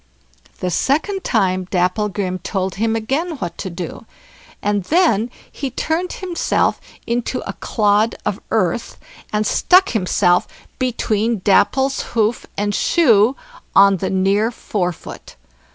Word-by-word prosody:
The 180 - -1
second 320 - 0
time 185 -5 +1
Dapplegrim 185 0 0
told 190 0 -2
him 225 0 +1
again 285 +9 -2
what 175 -9 -5
to 190 - -4
do; 175 +5 -7 0.5
and 205 -1 0
then 250 - +2 0.2
he 275 - -4
turned 330 +7 -2
himself 365 -3 0 0.2
into 240 +2 -2
a - - -4
clod 210 +1 +1
of - - -2
earth, - - -1 0.3
and 215 0 0
stuck 370 - +4
himself 180 -3 +2 0.3
between 230 -4 0
Dapple's 265 +7 +3 0.2
hoof 220 +1 +1
and 205 0 0
shoe 235 - +4 0.4
on 195 0 +6
the 190 +1 -2
near 195 +3 +2
forefoot. 180 -7 -5
215 Hz, 120 wpm, -19 LUFS, 190-255 Hz, 0.5 s, on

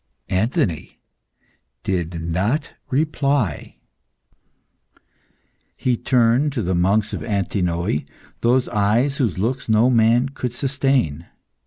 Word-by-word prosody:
Anthony 105 - -1 0.8
did 85 -3 -2
not 95 - -1 0.2
reply. 140 - 0 2.0
He 125 -1 +1
turned 125 +4 +2
to 120 -6 -2
the 95 +1 -1
monks 100 +5 +1
of - - -4
Antinoe 90 -6 -1 0.4
those 125 +2 +2
eyes 115 +7 +1
whose 115 -10 0
looks 120 +6 -2
no 110 +4 +4
man 120 +2 +3
could 125 -3 -5
sustain. 130 - 0
115 Hz, 100 wpm, -21 LUFS, 95-130 Hz, 2.0 s, no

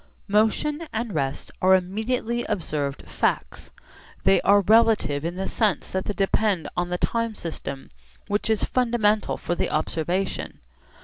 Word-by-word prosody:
Motion 225 +10 +1
and 225 -1 -3
rest 140 -3 -2
are 190 +1 +6
immediately 220 +6 -1
observed 150 -8 -3
facts. 65 - -2 0.5
They 95 0 +4
are 200 +1 +5
relative 215 -8 +3
in 170 +2 -3
the 190 +1 -3
sense 215 -5 0
that 190 0 -2
they 205 - -2
depend 195 -2 +1
on 175 0 -1
the 180 - -1
time 230 +2 -1
system 140 -6 -6 0.4
which 205 +2 -1
is 220 -2 +2
fundamental 230 -4 +1
for - - -2
the - - -1
observation. 170 +5 -2
200 Hz, 140 wpm, -24 LUFS, 175-220 Hz, 0.5 s, are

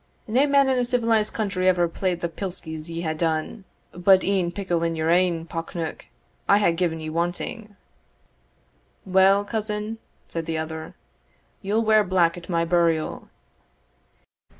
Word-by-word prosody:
"Nae 255 +6 +3
man 280 -1 +4
in 260 -1 +2
a - - +2
civilised 230 -3 +1
country 190 -4 -1
ever 175 -2 +3
played 175 +1 -2
the 170 - 0
pliskies 165 -3 -6
ye 165 0 -4
hae 160 -2 -1
done 160 +5 -2 0.3
but 185 +2 +4
e'en 185 -3 +1
pickle 175 -3 -2
in 165 0 0
your 160 +1 0
ain 175 -2 +2
pock 165 +1 -6
neuk 165 -2 -5 0.4
I 200 - +7
hae 200 -5 +3
gi'en 165 -1 -1
ye 155 0 -5
wanting." 175 +6 -3 1.3
"Well, 195 +1 +4
cousin," 215 0 -3 0.3
said 165 -1 -5
the 165 -1 -2
other, 160 0 -6 0.7
"ye'll 210 +3 0
wear 215 -1 +4
black 180 -3 +2
at 175 +2 -11
my 170 -1 +1
burial." 165 -2 0
180 Hz, 150 wpm, -24 LUFS, 165-205 Hz, 1.3 s, I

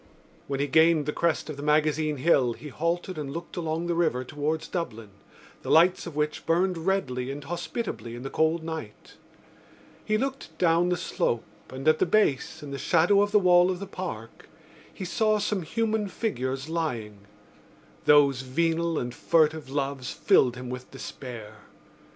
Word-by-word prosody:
When 135 -1 -2
he 140 - +2
gained 160 0 +4
the 150 - -2
crest 170 -2 0
of 155 -3 -6
the - - -6
Magazine 150 0 +1
Hill 130 -4 +3
he 150 +5 -10
halted 170 +3 -2
and 140 -2 -4
looked 165 +4 -7
along 165 -1 -2
the 175 - 0
river 165 -7 +1
towards 155 +4 -3
Dublin, 115 - -5 0.5
the - - -7
lights 175 +3 +4
of 165 - -8
which 150 0 -2
burned 170 0 +1
redly 130 -10 0
and 140 +1 -6
hospitably 170 - -4
in 120 - -8
the 135 - -5
cold 160 +1 +1
night. 160 -10 -7 0.9
He 215 - +1
looked 270 +3 -4
down 170 0 +3
the 180 - +1
slope 120 -7 -1 0.3
and, 135 +3 -6
at 155 0 +5
the - - +2
base, 165 -8 +1
in 145 - -7
the 140 - -5
shadow 180 +4 +4
of 205 0 +1
the 210 - +5
wall 180 -2 +5
of 185 -1 -2
the 200 - -5
Park, 170 - -7 0.4
he 185 - -7
saw 215 +4 +2
some 205 -1 -1
human 220 +4 -1
figures 135 - -3
lying. 115 -12 -4 0.8
Those 140 -3 +5
venal 165 +5 0
and 120 0 -3
furtive 155 0 +2
loves 135 -2 -2
filled 125 -2 +3
him 125 0 -7
with 125 0 -7
despair. 120 -5 -8
155 Hz, 170 wpm, -27 LUFS, 135-175 Hz, 0.9 s, at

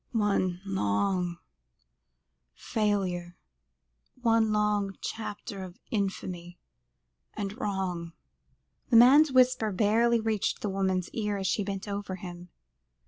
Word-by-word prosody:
"One 200 -5 +1
long 180 - 0 1.2
failure 190 -6 -1 0.8
one 225 -2 +3
long 210 -2 0
chapter 205 -2 -6
of 180 -1 -10
infamy 185 -4 -3 0.8
and 200 -1 -4
wrong," 185 -6 -3 0.8
the 240 - +3
man's 275 +6 +7
whisper 255 -4 +3
barely 230 +4 +3
reached 220 -2 -1
the 210 - -1
woman's 190 -2 0
ears, 210 -3 -2
as 190 - -1
she 205 - 0
bent 195 0 -5
over 200 -2 -4
him. 175 -1 -9
200 Hz, 105 wpm, -28 LUFS, 185-220 Hz, 1.2 s, man's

